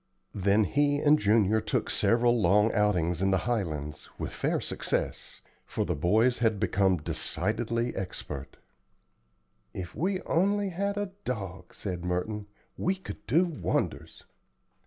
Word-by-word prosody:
Then 100 +2 +3
he 145 +7 +2
and 150 +1 +4
Junior 105 +1 +3
took - - -1
several 120 0 +3
long 105 +4 +4
outings 90 -5 +1
in 95 - +3
the 95 -3 +1
Highlands, 75 -11 -3
with - - -4
fair - - 0
success; - - -3 0.3
for - - -1
the - - 0
boys 110 - +3
had 110 -4 +2
become 95 -1 +2
decidedly 110 +9 -1
expert. 75 -7 -6 1.2
"If 90 -3 -6
we 185 +5 0
only 200 +3 +1
had 200 +3 -2
a 205 -2 -2
dog," 95 -7 -5
said 90 -3 -4
Merton, 95 +4 -2 0.3
"we 185 +2 +1
could 190 - -9
do 170 +5 +4
wonders." 165 -5 -2
105 Hz, 135 wpm, -29 LUFS, 90-135 Hz, 1.2 s, and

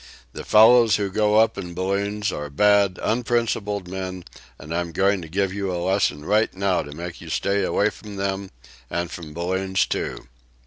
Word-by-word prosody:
The - - -7
fellows 115 +1 +6
who 100 -2 -2
go 105 +1 +2
up 110 -2 +3
in 90 -3 -7
balloons 100 +2 -1
are 75 -3 -5
bad, 100 +3 +3
unprincipled 110 -4 -1
men, 95 -1 -5 0.3
and 80 - -8
I'm 85 -1 -2
going 100 +1 +2
to 80 - -9
give 95 +2 -1
you 100 -2 -2
a 90 - -2
lesson 85 -4 0
right 105 +4 +2
now 95 -1 +1
to 75 - -9
make 85 +3 -7
you 85 - -10
stay 100 +5 0
away 105 +1 +1
from 105 -1 -11
them, 95 0 -3 0.4
and 85 0 -3
from 80 -3 -8
balloons, 95 +2 0
too." - - -4
95 Hz, 180 wpm, -23 LUFS, 90-105 Hz, 0.4 s, fellows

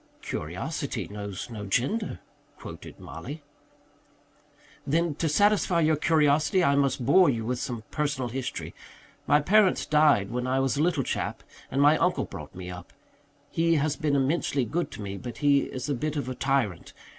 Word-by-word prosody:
"'Curiosity - - -4
knows 100 -2 -6
no 105 -3 -6
gender,'" 130 - -1 0.4
quoted - - -10
Mollie. 145 +4 -8 1.4
"Then, 165 +2 +1
to 160 +2 -1
satisfy 200 0 +3
your 155 0 +3
curiosity, 155 +3 +3
I 140 - +4
must 135 -3 +1
bore 175 +6 +6
you 115 -4 -1
with 125 +1 -2
some 120 -4 -4
personal 145 -5 -1
history. 130 +1 -5 0.5
My 145 - +5
parents 195 +4 +3
died 150 -10 +3
when 125 +1 -2
I 130 +1 +1
was 135 -3 +1
a 145 - 0
little 160 -4 +1
chap, - - -3 0.3
and 140 +2 +1
my 150 +2 +5
uncle - - +1
brought - - -10
me 90 0 -7
up. 90 -1 -10 0.6
He 165 0 +2
has 150 0 +1
been 150 -3 0
immensely 140 -1 +1
good 170 +10 -2
to 105 - -7
me, 100 0 -5
but 120 +3 -7
he 140 -1 +3
is 130 +1 -6
a 145 - 0
bit 150 +4 -2
of 145 -3 -2
a 130 - -3
tyrant. 130 -9 -1
140 Hz, 170 wpm, -27 LUFS, 125-155 Hz, 1.4 s, bore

